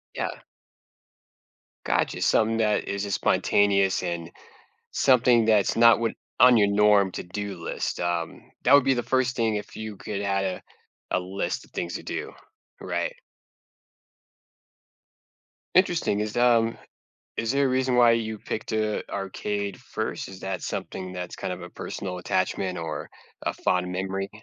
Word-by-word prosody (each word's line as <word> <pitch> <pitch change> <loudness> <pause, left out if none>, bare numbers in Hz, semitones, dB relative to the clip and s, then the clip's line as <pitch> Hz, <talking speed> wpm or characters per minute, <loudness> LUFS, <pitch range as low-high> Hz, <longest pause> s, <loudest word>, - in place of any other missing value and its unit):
Yeah. - - -3 1.4
Gotcha, - - 0
something 110 +1 +2
that 105 -2 +1
is 100 +1 -2
as 100 - -3
spontaneous 100 -1 +2
and 85 -1 -4 0.6
something 120 -3 +4
that's 110 -1 +3
not 115 -2 +7
what 115 -1 +1 0.3
on 125 -2 +7
your 100 - +5
norm 100 -2 +4
to-do 100 +2 -5
list. - - -3
Um, 85 -1 -3
that - - +5
would 140 - +8
be 135 - +3
the 120 - -1
1st 130 -1 +1
thing 115 -2 +1
if 105 - -6
you 110 -1 -6
could 100 0 -4
add 100 -1 0
a 95 -1 -3 0.5
a - - +2
list 95 +2 -3
of - - -19
things 85 - -4
to - - -4
do, - - -5 0.5
right? - - -2 2.6
Interesting, 175 - +3
is, 105 +2 -3
um, 115 -2 +3 0.6
is 115 0 0
there 140 +2 +2
a - - +3
reason 130 -1 +1
why 120 -1 +7
you 110 -2 0
picked 110 - -5
a 110 -1 -1
arcade 100 0 -3
1st? - - -4
Is 95 -1 -11
that 95 -1 -3
something 95 0 -5
that's 90 -1 -5
kind 95 - -4
of 90 - -5
a 90 - -9
personal 90 0 -5
attachment 90 +1 -1
or, 80 -1 -5 0.3
a - - -2
fond 90 0 0
memory? 95 +1 -3
105 Hz, 150 wpm, -26 LUFS, 95-115 Hz, 2.6 s, would